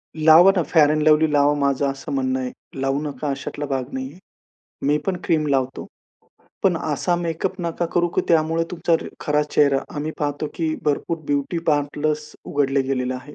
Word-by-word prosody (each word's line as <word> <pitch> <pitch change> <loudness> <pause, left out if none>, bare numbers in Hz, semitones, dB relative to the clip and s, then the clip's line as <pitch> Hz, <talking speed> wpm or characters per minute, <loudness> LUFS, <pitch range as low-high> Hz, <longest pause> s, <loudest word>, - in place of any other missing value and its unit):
लावा 160 +4 +7
ना, 180 - +2
fair 150 -1 +4
end 155 0 +1
lovely 155 0 +5
लावा, 145 0 +4
माझं 140 -1 +1
असं 135 - -8
म्हणणं 265 -1 0
आहे. 255 -1 -3 0.3
लावू 135 +2 0
नका 145 -1 -4
अशातला 140 +1 -4
भाग 135 -2 -2
नाही 130 0 -4
आहे. 175 - -16 0.7
मी 150 +1 +3
पण 190 -2 0
क्रीम 155 -4 +1
लावतो. 135 -2 -1 0.8
पण - - +3
असा 175 -1 0
मेकअप 175 +2 -3
नका 170 0 -2
करू, 175 0 +3
की - - 0
त्यामुळे 165 0 +2
तुमचा 170 -1 +1 0.3
खरा 150 0 +1
चेहरा. 145 -2 +2 0.2
आम्ही 150 +2 -2
पाहतो, 145 0 -2
की 160 -2 -1
भरपूर 155 +3 -1
ब्युटी 145 +4 -1
पार्लर्स 150 0 0
उघडले 140 -1 +1
गेलेले 130 -1 -2
आहे. 130 +4 -9
150 Hz, 175 wpm, -22 LUFS, 140-165 Hz, 0.8 s, लावा